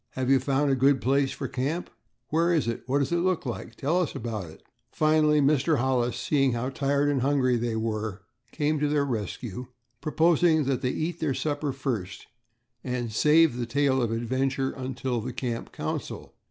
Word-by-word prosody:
"Have 130 Hz, 0 st, 0 dB
you 135 Hz, -, +5 dB
found 140 Hz, +2 st, +1 dB
a -, -, +3 dB
good 135 Hz, +1 st, +3 dB
place 135 Hz, +2 st, +1 dB
for 140 Hz, -, -4 dB
camp?" 145 Hz, +9 st, -2 dB, 0.4 s
"Where 165 Hz, +3 st, +2 dB
is 160 Hz, -8 st, +1 dB
it?" 115 Hz, -, -2 dB
"What 135 Hz, +2 st, +1 dB
does 140 Hz, +1 st, 0 dB
it 170 Hz, -, +2 dB
look 180 Hz, -2 st, 0 dB
like?" 120 Hz, -2 st, -5 dB
"Tell 160 Hz, +9 st, +1 dB
us 175 Hz, -, -3 dB
all -, -, -2 dB
about 110 Hz, -7 st, -4 dB
it." 80 Hz, -, -15 dB, 0.3 s
Finally, 155 Hz, -1 st, +3 dB
Mr. 145 Hz, +2 st, +3 dB
Hollis, 125 Hz, -1 st, 0 dB
seeing 135 Hz, +1 st, +1 dB
how 120 Hz, +2 st, -2 dB
tired 140 Hz, +1 st, 0 dB
and 140 Hz, -3 st, +1 dB
hungry 130 Hz, -2 st, +2 dB
they 120 Hz, -1 st, -1 dB
were, 110 Hz, -3 st, -3 dB, 0.3 s
came 150 Hz, 0 st, 0 dB
to 150 Hz, -, +1 dB
their 145 Hz, -1 st, +1 dB
rescue, 120 Hz, -1 st, -4 dB, 0.3 s
proposing 160 Hz, 0 st, +3 dB
that 130 Hz, -2 st, -1 dB
they 125 Hz, -, 0 dB
eat 165 Hz, +5 st, -3 dB
their 145 Hz, -4 st, 0 dB
supper 145 Hz, -1 st, -1 dB
first 120 Hz, -9 st, -4 dB, 0.6 s
and 125 Hz, -3 st, -3 dB
save 150 Hz, +2 st, +4 dB
the 120 Hz, -1 st, -3 dB
tale 135 Hz, +1 st, +2 dB
of 115 Hz, -2 st, 0 dB
adventure 130 Hz, +3 st, -1 dB
until 130 Hz, -2 st, -3 dB
the -, -, -5 dB
camp 120 Hz, -3 st, -4 dB
council. -, -, -5 dB
135 Hz, 190 wpm, -27 LUFS, 120-150 Hz, 0.6 s, you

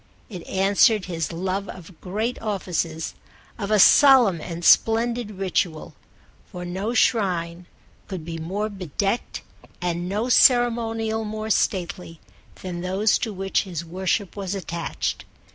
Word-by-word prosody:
It 180 Hz, -4 st, -7 dB
answered 200 Hz, +2 st, +3 dB
his 165 Hz, -3 st, -3 dB
love 190 Hz, +3 st, -3 dB
of 180 Hz, -1 st, -10 dB
great 215 Hz, +6 st, -3 dB
offices, 175 Hz, -6 st, -3 dB, 0.5 s
of 200 Hz, -2 st, -3 dB
a 215 Hz, -, +3 dB
solemn 240 Hz, -, +6 dB
and 170 Hz, +1 st, -6 dB
splendid 230 Hz, 0 st, +3 dB
ritual; 185 Hz, -5 st, -2 dB, 0.6 s
for 180 Hz, -2 st, -7 dB
no 195 Hz, +7 st, -3 dB
shrine 180 Hz, -7 st, 0 dB, 0.4 s
could 185 Hz, -5 st, -6 dB
be 165 Hz, -1 st, -6 dB
more 195 Hz, +6 st, -3 dB
bedecked 195 Hz, -, -3 dB, 0.4 s
and 175 Hz, 0 st, -2 dB
no 210 Hz, +5 st, -1 dB
ceremonial 230 Hz, -3 st, +3 dB
more 215 Hz, 0 st, -4 dB
stately 180 Hz, -4 st, -1 dB, 0.4 s
than 175 Hz, -2 st, -5 dB
those 190 Hz, +4 st, +1 dB
to 225 Hz, -, -3 dB
which 195 Hz, -1 st, -1 dB
his 170 Hz, -4 st, -6 dB
worship 190 Hz, +3 st, -2 dB
was 200 Hz, -1 st, -4 dB
attached. 170 Hz, -3 st, -4 dB
195 Hz, 125 wpm, -23 LUFS, 175-215 Hz, 0.6 s, solemn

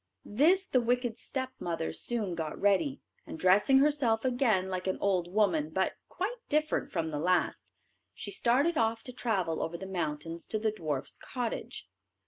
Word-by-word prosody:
This 330 Hz, -, +3 dB
the 255 Hz, -, +2 dB
wicked 240 Hz, -1 st, 0 dB
stepmother 255 Hz, -12 st, -3 dB
soon 220 Hz, -7 st, -1 dB
got 160 Hz, -2 st, -4 dB
ready, 205 Hz, +8 st, +2 dB, 0.3 s
and -, -, -6 dB
dressing 195 Hz, +10 st, +5 dB
herself 270 Hz, -5 st, +2 dB
again 245 Hz, -7 st, +2 dB
like 185 Hz, 0 st, -3 dB
an 190 Hz, -, 0 dB
old 180 Hz, -3 st, +1 dB
woman, 220 Hz, -, +2 dB
but -, -, 0 dB, 0.2 s
quite 425 Hz, +7 st, -3 dB
different 305 Hz, +1 st, 0 dB
from 160 Hz, -2 st, -1 dB
the 150 Hz, -, -2 dB
last, 180 Hz, +3 st, 0 dB, 0.4 s
she -, -, -5 dB
started 290 Hz, 0 st, +2 dB
off 225 Hz, 0 st, +1 dB
to 250 Hz, -, -9 dB
travel 195 Hz, -10 st, -1 dB
over 170 Hz, +1 st, -3 dB
the 190 Hz, -, -7 dB
mountains 165 Hz, -2 st, -4 dB
to 220 Hz, -, -1 dB
the 215 Hz, 0 st, 0 dB
dwarfs' 155 Hz, -9 st, -4 dB
cottage. 245 Hz, -3 st, -4 dB
215 Hz, 160 wpm, -30 LUFS, 180-260 Hz, 0.4 s, dressing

